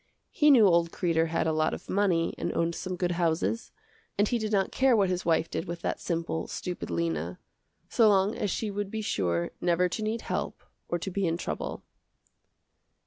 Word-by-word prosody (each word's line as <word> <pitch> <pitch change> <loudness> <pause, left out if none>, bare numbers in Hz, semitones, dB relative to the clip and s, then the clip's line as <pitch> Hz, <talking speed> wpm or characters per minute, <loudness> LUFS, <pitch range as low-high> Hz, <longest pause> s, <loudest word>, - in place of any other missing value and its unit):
He 300 - +4
knew 245 -7 +7
old 170 -2 +4
Kreder 165 -2 +1
had 165 0 0
a 160 - +1
lot 155 0 +1
of - - -12
money 185 -4 +1
and - - -3
owned 170 0 +1
some 185 +2 -4
good 180 0 -1
houses, 170 +6 0 0.5
and 205 +1 +3
he 240 - 0
did 215 -1 -3
not 195 -2 +1
care 260 -2 +4
what 195 -3 +3
his 180 0 -2
wife 165 -1 +2
did 165 - -4
with 170 -1 -6
that - - -1
simple, 165 -1 -2
stupid 180 -1 -5
Lena, 85 0 -2 0.5
so 225 -2 +4
long 200 +1 +3
as 205 - -1
she 210 +3 -2
would 205 0 -3
be 220 +1 -4
sure 85 - 0
never 175 +1 +2
to 215 - -4
need 220 +2 -2
help - - -4 0.3
or 175 - 0
to 190 +3 -5
be 195 0 0
in 165 0 0
trouble. - - -4
175 Hz, 200 wpm, -28 LUFS, 165-205 Hz, 0.5 s, knew